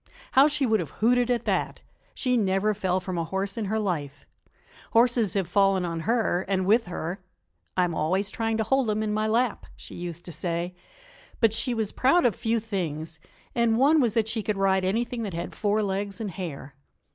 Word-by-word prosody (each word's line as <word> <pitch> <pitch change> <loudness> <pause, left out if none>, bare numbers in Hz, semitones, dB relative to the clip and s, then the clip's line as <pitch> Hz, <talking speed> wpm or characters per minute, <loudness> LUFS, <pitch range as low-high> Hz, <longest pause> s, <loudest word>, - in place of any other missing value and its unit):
How 270 +2 +6
she 295 -2 0
would 220 -3 +2
have - - -4
hooted 245 +2 +3
at 240 -2 0
that! - - -1 0.3
She 250 -2 0
never 205 -1 +2
fell 190 -2 0
from 180 -1 -4
a - - 0
horse 195 +3 -3
in 225 - -2
her 215 +3 -1
life. 150 -9 -3 0.7
Horses 230 -4 +3
have 195 -4 0
fallen 195 0 +3
on 165 -1 -3
her 225 -6 +2
and 190 -1 0
with 220 +2 +3
her 175 +1 -4 0.6
"I'm 180 -2 +2
always 190 +6 0
trying 225 +1 -1
to 220 - +1
hold 265 +1 +1
'em 215 +1 0
in 210 -1 -1
my 215 +1 0
lap," 235 +1 0
she - - -11
used 175 -1 -7
to 175 - -7
say. 170 +2 -3 0.7
But 225 -2 +4
she 240 +2 0
was 220 -2 -1
proud 275 +6 +3
of 230 -6 +3
few 230 0 0
things, 165 -7 -4 0.3
and 235 -2 +2
one 290 +5 +5
was 235 -5 +1
that 225 -2 +2
she 225 0 -1
could 210 -1 -2
ride 190 -1 +2
anything 230 +5 -1
that 200 -6 -4
had 170 - -5
four 210 0 0
legs 200 +1 -3
and 215 -4 -3
hair. 155 -6 -7
205 Hz, 205 wpm, -26 LUFS, 185-230 Hz, 0.7 s, How